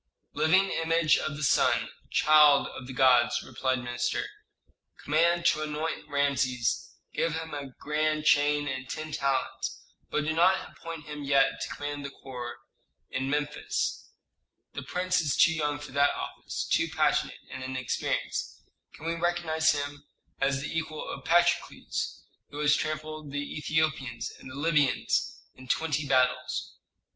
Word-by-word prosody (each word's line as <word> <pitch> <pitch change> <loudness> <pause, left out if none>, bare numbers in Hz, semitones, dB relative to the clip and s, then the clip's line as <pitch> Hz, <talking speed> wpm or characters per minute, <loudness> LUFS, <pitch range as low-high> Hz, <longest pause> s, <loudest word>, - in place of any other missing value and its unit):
"Living 190 +5 +3
image 165 -1 +3
of 150 - -3
the 150 - -4
sun, - - +3 0.2
child 150 -2 +6
of 125 - -9
the - - -6
gods," 125 -2 +4
replied 130 -1 -1
the 125 - -6
minister. 120 0 -1 0.8
"Command 170 +3 +2
to 155 - +3
anoint 155 0 -3
Rameses, 140 -4 0 0.2
give 165 -1 0
him 160 -1 -5
a 145 -1 -4
grand 155 0 0
chain 145 -1 +4
and 130 -1 -4
ten 155 0 -5
talents, 135 -2 -2 0.3
but 150 - 0
do 155 - 0
not 180 +4 +3
appoint 165 -2 -8
him 150 -1 -7
yet 140 -1 +3
to - - -4
command 145 0 -4
the 140 - -4
corps 125 -3 -7 0.6
in 135 0 -2
Memphis. 145 +1 -2 0.6
The - - -5
prince 180 0 0
is 150 -4 0
too 165 0 +6
young 150 -2 -1
for 145 -1 -9
that 140 +1 +3
office, - - -5
too - - +2
passionate - - +1
and 130 0 -6
inexperienced. 130 -1 -3 0.3
Can 155 - -11
we 165 - 0
recognize 170 -2 +1
him 145 0 -5 0.3
as 135 0 +1
the 150 - -5
equal 155 -1 -3
of - - -7
Patrokles, 175 +1 +1 0.3
who 145 - -9
has 150 0 +4
trampled 155 -1 -4
the 145 +1 -4
Ethiopians 145 -7 -1
and - - -11
the 130 - -9
Libyans 145 -2 +1
in 130 0 -14
twenty 150 +1 0
battles? 130 -1 +1
150 Hz, 150 wpm, -28 LUFS, 135-155 Hz, 0.8 s, child